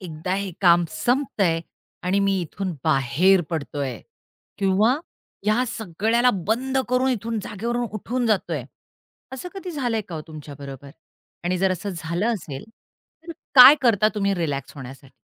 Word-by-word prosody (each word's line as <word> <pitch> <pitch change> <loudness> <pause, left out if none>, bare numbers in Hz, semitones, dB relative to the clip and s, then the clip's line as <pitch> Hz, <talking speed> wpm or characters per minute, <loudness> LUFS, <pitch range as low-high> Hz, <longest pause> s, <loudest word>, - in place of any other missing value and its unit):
एकदा 175 0 -4
हे 200 0 -2
काम 175 -2 +5
संपतंय 195 - 0 0.4
आणि 180 +2 +1
मी 195 -1 +2
इथून 180 +3 -4
बाहेर 155 +6 +3
पडतोय. 145 -4 -3 0.6
किंवा 200 +5 +3 0.5
या 215 +4 +3
सगळ्याला 225 +3 +1 0.2
बंद 260 +4 0
करून 255 +1 +2
इथून 230 -1 -2
जागेवरून 235 +4 -3
उठून 240 +4 -2
जातोय. 175 - 0 0.7
असं 265 +7 -6
कधी 380 -2 -6
झालंय 245 -8 -1
का 175 - -6
हो 155 - -4
तुमच्या 150 -2 -9
बरोबर? 140 0 -9 0.5
आणि 180 +1 0
जर 190 0 +2
असं 190 +3 -4
झालं 170 +5 -2
असेल 145 -9 -7 0.6
तर - - -4 0.2
काय 265 +2 +11
करता 215 -4 +4
तुम्ही 200 -1 +1
रिलॅक्स 145 -6 -3
होण्यासाठी? 135 0 -11
195 Hz, 140 wpm, -23 LUFS, 160-230 Hz, 0.7 s, काय